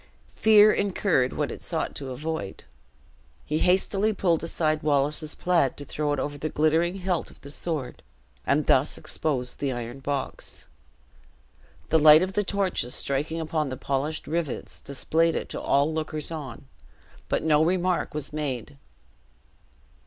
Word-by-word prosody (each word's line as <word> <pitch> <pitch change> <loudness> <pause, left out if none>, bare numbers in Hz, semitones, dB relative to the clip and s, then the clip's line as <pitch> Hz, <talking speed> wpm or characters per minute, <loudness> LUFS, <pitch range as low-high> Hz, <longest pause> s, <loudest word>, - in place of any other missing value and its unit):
Fear 215 -1 +7
incurred 190 -9 +1
what - - -2
it - - -8
sought - - -2
to 135 -2 -6
avoid. 130 -6 -5 0.8
He 155 +1 -1
hastily 195 +3 +2
pulled 170 -5 +1
aside 155 -2 0
Wallace's 150 +1 0
plaid 170 -7 +1
to 145 - -8
throw 150 0 -2
it 145 - 0
over 145 +2 -3
the 155 - -2
glittering 160 +4 +2
hilt 185 -2 -2
of - - -17
the 140 - -10
sword, 150 -5 -3 0.4
and 150 +2 +1
thus 135 +3 +3
exposed 130 -5 -3
the 140 -2 -1
iron 120 +1 -5
box. 140 0 -4 1.2
The 160 - +4
light 155 +2 +8
of 190 +1 -3
the 205 - +1
torches 190 -10 -1
striking 145 +4 -1
upon 155 -2 -1
the 130 - -5
polished 140 +5 -2
rivets, 160 -3 -3
displayed 160 +4 +1
it - - -3
to - - -5
all 145 +3 +2
lookers 155 0 -3
on, 140 -6 -7 0.6
but - - 0
no 155 -1 +4
remark 180 -1 0
was 150 -1 -4
made. 130 - -4
155 Hz, 150 wpm, -26 LUFS, 140-170 Hz, 1.2 s, light